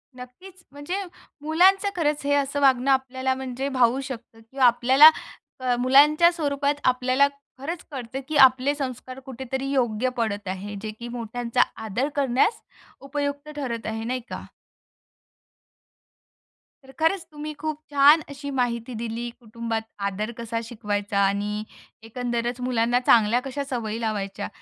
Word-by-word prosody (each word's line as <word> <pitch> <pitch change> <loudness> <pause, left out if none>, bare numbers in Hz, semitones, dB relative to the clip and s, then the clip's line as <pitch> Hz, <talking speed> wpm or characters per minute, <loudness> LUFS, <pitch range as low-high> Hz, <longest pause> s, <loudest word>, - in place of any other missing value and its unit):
नक्कीच. 350 +10 -13
म्हणजे 290 +8 -4 0.4
मुलांचं 370 +6 +4
खरंच 300 -3 0
हे 285 - +2
असं 285 0 0
वागणं 265 -1 +4
आपल्याला 260 0 0
म्हणजे 265 +1 -4
भावू 255 -1 +2
शकतं 245 -4 -9
किंवा 265 -1 +2
आपल्याला 255 +5 +7 0.5
अ, 255 -1 +1
मुलांच्या 295 +6 +6
स्वरूपात 285 -3 -1
आपल्याला 255 +2 +3 0.3
खरंच 315 +5 -5
कळतं 260 -1 -5
की 310 - -4
आपले 265 +1 +6
संस्कार 255 -2 -6
कुठेतरी 265 +1 -5
योग्य 250 -2 +1
पडत 205 -4 -2
आहे 195 +2 -5
जे 215 0 -5
की 240 - -6
मोठ्यांचा 235 0 -2 0.2
आदर 235 +7 -1
करण्यास 280 - +1 0.4
उपयुक्त 285 +1 -4
ठरत 240 -6 -4
आहे. 220 0 -3
नाही 250 +3 -2
का? - - -6 2.4
तर 265 - -15
खरंच 330 +3 +1
तुम्ही 305 0 -6
खूप 310 -1 -3
छान 290 +3 +6
अशी 285 0 -7
माहिती 235 0 -1
दिली. 230 +1 -4
कुटुंबात 230 -1 -4 0.3
आदर 210 +4 -4
कसा 230 0 -3
शिकवायचा 205 -3 -2
आणि 205 +2 -1 0.4
एकंदरच 240 +1 -3
मुलांना 245 -1 +1
चांगल्या 230 +1 +5
कशा 275 +1 -3
सवयी 225 -3 -3
लावायच्या. 205 -2 -3
255 Hz, 135 wpm, -24 LUFS, 230-285 Hz, 2.4 s, आपल्याला